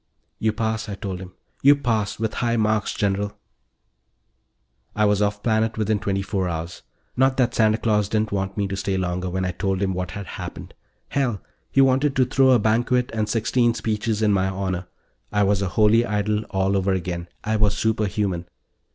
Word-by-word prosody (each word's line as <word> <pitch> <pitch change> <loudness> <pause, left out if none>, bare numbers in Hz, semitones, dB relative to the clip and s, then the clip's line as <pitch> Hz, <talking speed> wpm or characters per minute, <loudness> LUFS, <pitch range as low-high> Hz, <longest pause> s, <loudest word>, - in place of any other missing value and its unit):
"You 110 - +2
pass," 110 0 -2
I 100 - -4
told 95 -2 -5
him. 90 -1 -10 0.3
"You 140 +1 +7
pass 110 -7 -1
with 110 -1 -2
high 120 -1 0
marks, 110 -1 +1
General." 100 0 -1 1.6
I 105 - +3
was 105 0 +2
off 100 0 0
planet 110 0 +1
within 110 -1 +1
twenty 100 0 -1
four 95 -2 -1
hours. 85 +2 -5 0.3
Not 130 +1 +3
that 125 -3 +2
Santa 110 -1 +3
Claus 105 -3 +1
didn't 110 0 0
want 95 0 -2
me 100 -1 0
to 95 - -3
stay 95 0 -1
longer, 90 0 -2
when 95 +1 -2
I 90 - -1
told 95 +1 -1
him 95 -1 0
what 90 0 -3
had 100 +1 -6
happened. - - -8 0.4
Hell, 125 -7 0 0.3
he 135 - +4
wanted 135 +2 +3
to 130 - +4
throw 130 +1 +3
a 130 - +6
banquet 120 +3 +1
and 110 -1 -1
sixteen 120 +2 +2
speeches 110 0 -1
in 105 -1 +4
my 95 -1 +2
honor. 95 -1 -3 0.4
I 105 0 +2
was 100 0 +2
a 95 - 0
holy 110 +2 +5
Idol 105 -1 -1
all 95 0 0
over 95 0 +1
again. 85 -1 -3 0.2
I 110 +1 0
was 105 -1 +2
superhuman. 105 -5 -1
105 Hz, 190 wpm, -23 LUFS, 95-110 Hz, 1.6 s, You